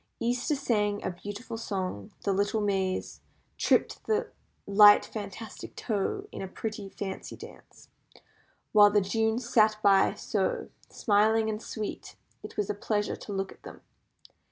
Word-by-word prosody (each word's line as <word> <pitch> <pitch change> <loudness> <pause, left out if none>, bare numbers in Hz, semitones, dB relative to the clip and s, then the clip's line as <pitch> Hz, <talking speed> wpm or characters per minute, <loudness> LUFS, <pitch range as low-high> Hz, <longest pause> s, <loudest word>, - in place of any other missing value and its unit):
Easter 245 +5 0
sang 210 -7 0
a - - -1
beautiful 205 +6 -7
song, 185 - -4
the 200 - +1
little 205 +3 +1
Mays, 195 -2 -1 0.4
"tripped - - +2
the 445 +2 0 0.3
light 205 +1 +7
fantastic 210 +1 -8
toe" 250 - -2
in - - -7
a 190 - -4
pretty 210 0 -5
fancy 195 -1 -6
dance, - - -14 0.8
while 205 -1 +8
the 205 0 +4
Junes 220 +4 0
sat 215 -2 +4
by 195 -1 +5
so 485 -3 -2 0.2
smiling 220 +1 +2
and 215 0 -5
sweet 215 -3 -6 0.3
it - - -10
was 210 -2 0
a 210 - -1
pleasure 205 0 -1
to - - -9
look 195 -1 -2
at - - -16
them. - - -11
210 Hz, 145 wpm, -28 LUFS, 200-225 Hz, 0.8 s, while